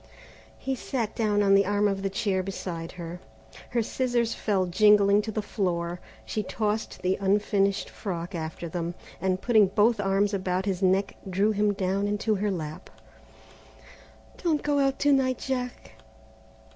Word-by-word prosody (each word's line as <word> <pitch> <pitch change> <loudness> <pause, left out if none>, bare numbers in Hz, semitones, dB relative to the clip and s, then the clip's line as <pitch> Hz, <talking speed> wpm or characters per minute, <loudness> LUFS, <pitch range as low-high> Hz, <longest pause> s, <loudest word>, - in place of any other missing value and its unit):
He 270 - -3
sat 240 -3 -3
down 210 -2 +2
on 195 -1 +4
the 195 -1 +5
arm 205 0 +2
of 195 -1 -1
the 195 - -1
chair 195 -1 0
beside 180 -3 -5
her. 175 0 -7 0.5
Her 235 -1 +1
scissors 240 -1 0
fell 195 -4 0
jingling 205 +2 +5
to 220 +1 -5
the 215 0 -2
floor; 175 -4 -2 0.3
she 215 - -2
tossed 215 -1 -3
the 185 +1 +1
unfinished 200 0 +1
frock 175 -2 -5
after 160 0 -5
them, 170 +1 -4 0.3
and 185 -1 +1
putting 220 -3 +5
both 215 +3 +3
arms 200 +1 +1
about 185 -1 -1
his 190 -2 -1
neck 190 +1 +2
drew 195 +4 +2
him 210 0 +2
down 195 +1 0
into 210 +2 0
her 205 +1 0
lap. 155 -5 -5 1.5
"Don't 320 -4 +1
go 290 -1 +1
out 270 -1 +2
to 285 0 +5
night, 260 -2 +2
Jack." 250 - -4
200 Hz, 160 wpm, -27 LUFS, 185-220 Hz, 1.5 s, the